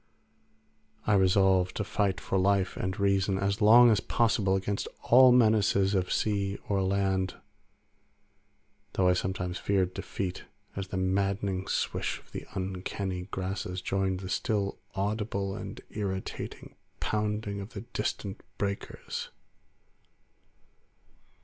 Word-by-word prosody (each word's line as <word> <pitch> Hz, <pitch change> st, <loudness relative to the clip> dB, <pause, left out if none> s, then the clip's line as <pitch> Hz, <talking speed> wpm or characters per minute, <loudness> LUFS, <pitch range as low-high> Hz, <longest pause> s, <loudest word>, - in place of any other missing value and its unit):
I 105 Hz, -, +3 dB
resolved 95 Hz, -1 st, +4 dB
to 105 Hz, -, -1 dB
fight 100 Hz, -2 st, 0 dB
for 95 Hz, -, -1 dB
life 95 Hz, 0 st, +2 dB
and 95 Hz, +3 st, -3 dB
reason 100 Hz, -1 st, +2 dB
as 100 Hz, +3 st, -1 dB
long 115 Hz, +3 st, +8 dB
as 105 Hz, -, +3 dB
possible 105 Hz, -3 st, +2 dB
against 100 Hz, +1 st, -2 dB, 0.2 s
all 130 Hz, +1 st, +7 dB
menaces 105 Hz, -5 st, +4 dB
of 95 Hz, -2 st, 0 dB
sea 100 Hz, -2 st, 0 dB
or 100 Hz, -1 st, +1 dB
land, 95 Hz, -1 st, 0 dB, 1.6 s
though 95 Hz, -, +2 dB
I 90 Hz, -, +5 dB
sometimes 90 Hz, 0 st, -2 dB
feared 95 Hz, -2 st, +1 dB
defeat 95 Hz, -2 st, -4 dB, 0.3 s
as 95 Hz, -1 st, -4 dB
the 95 Hz, -, -4 dB
maddening 95 Hz, 0 st, 0 dB
swish -, -, -1 dB
of -, -, -20 dB
the -, -, -7 dB
uncanny 95 Hz, 0 st, -3 dB
grasses 95 Hz, -1 st, -3 dB
joined 95 Hz, 0 st, -1 dB
the 95 Hz, -, -6 dB
still 100 Hz, 0 st, -1 dB, 0.2 s
audible 100 Hz, -1 st, -1 dB
and -, -, -7 dB
irritating 95 Hz, -3 st, -5 dB, 0.3 s
pounding 105 Hz, -1 st, -1 dB
of 100 Hz, +4 st, -9 dB
the -, -, -5 dB
distant 105 Hz, -3 st, -4 dB, 0.2 s
breakers. 100 Hz, 0 st, -4 dB
100 Hz, 120 wpm, -29 LUFS, 95-105 Hz, 1.6 s, long